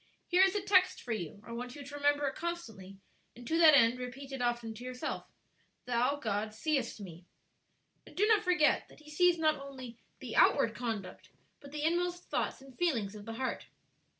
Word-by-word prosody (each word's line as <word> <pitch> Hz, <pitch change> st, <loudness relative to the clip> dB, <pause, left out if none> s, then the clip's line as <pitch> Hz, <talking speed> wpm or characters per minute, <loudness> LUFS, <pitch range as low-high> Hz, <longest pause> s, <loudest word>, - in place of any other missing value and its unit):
Here 360 Hz, +1 st, +3 dB
is 385 Hz, +1 st, +4 dB
a 410 Hz, -, -1 dB
text 370 Hz, -2 st, +4 dB
for 245 Hz, -, -6 dB
you; 205 Hz, -1 st, -5 dB
I -, -, -10 dB
want 245 Hz, +1 st, -6 dB
you 290 Hz, -, -8 dB
to 285 Hz, -, -10 dB
remember 290 Hz, 0 st, +2 dB
it 270 Hz, -, -2 dB
constantly; 225 Hz, -, -6 dB, 0.4 s
and 240 Hz, +1 st, -12 dB
to 325 Hz, +1 st, +1 dB
that 315 Hz, -3 st, +8 dB
end 240 Hz, -1 st, +4 dB
repeat 265 Hz, +2 st, -7 dB
it 270 Hz, -2 st, -5 dB
often 240 Hz, -2 st, -1 dB
to 230 Hz, +3 st, -10 dB
yourself, 250 Hz, 0 st, -5 dB, 0.6 s
'Thou, 250 Hz, +3 st, +1 dB
God, 215 Hz, -4 st, -3 dB
seest 265 Hz, -2 st, -1 dB
me.' 180 Hz, -3 st, -10 dB, 0.8 s
"And -, -, -15 dB
do 410 Hz, -, +4 dB
not 435 Hz, -1 st, +4 dB
forget 355 Hz, -4 st, +3 dB
that -, -, -18 dB
He 300 Hz, 0 st, -14 dB
sees 355 Hz, +3 st, +4 dB
not 310 Hz, -2 st, +2 dB
only 260 Hz, -4 st, -9 dB, 0.2 s
the -, -, -7 dB
outward -, -, +4 dB
conduct 225 Hz, -6 st, -5 dB, 0.3 s
but 280 Hz, -, -13 dB
the 300 Hz, 0 st, -4 dB
inmost 350 Hz, +2 st, 0 dB
thoughts -, -, -3 dB
and 270 Hz, -2 st, -15 dB
feelings 235 Hz, -, 0 dB
of 210 Hz, -1 st, -10 dB
the 225 Hz, -, -6 dB
heart." 260 Hz, +3 st, -3 dB
270 Hz, 200 wpm, -32 LUFS, 230-320 Hz, 0.8 s, that